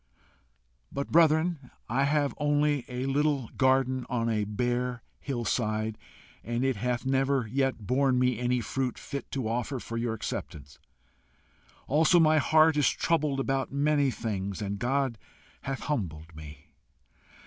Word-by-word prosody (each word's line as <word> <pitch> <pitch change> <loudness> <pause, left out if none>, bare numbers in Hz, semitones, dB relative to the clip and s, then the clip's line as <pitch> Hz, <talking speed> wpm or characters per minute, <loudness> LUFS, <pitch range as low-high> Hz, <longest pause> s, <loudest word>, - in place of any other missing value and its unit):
"But, 140 - -4
brethren, 160 -3 +3 0.2
I 135 - +1
have 145 -1 +1
only 145 -2 +1
a 125 0 -4
little 140 -2 0
garden 130 -1 +2
on 115 -2 0
a 105 -2 0
bare 120 +3 -2 0.2
hill 120 -4 -4
side, 110 -2 -1 0.5
and 120 +2 -1
it 135 -2 +1
hath 125 +3 -2
never 135 -1 +1
yet 130 -1 -1
borne 130 +2 +2
me 125 -2 +2
any 125 0 +1
fruit 130 0 -2
fit 140 - -6
to 130 -5 -3
offer 120 +4 -2
for 115 0 -6
your 115 -1 -1
acceptance; 70 -8 -6 1.1
also, 160 +5 +4
my 155 -1 +5
heart 155 +1 +4
is 145 - +4
troubled 150 -4 0
about 135 -1 -1
many 145 0 +2
things, 100 -5 -3
and 100 -1 -3
God 130 -1 0 0.4
hath 135 0 -4
humbled 85 - -4
me. 75 -1 -12
130 Hz, 140 wpm, -28 LUFS, 115-140 Hz, 1.1 s, my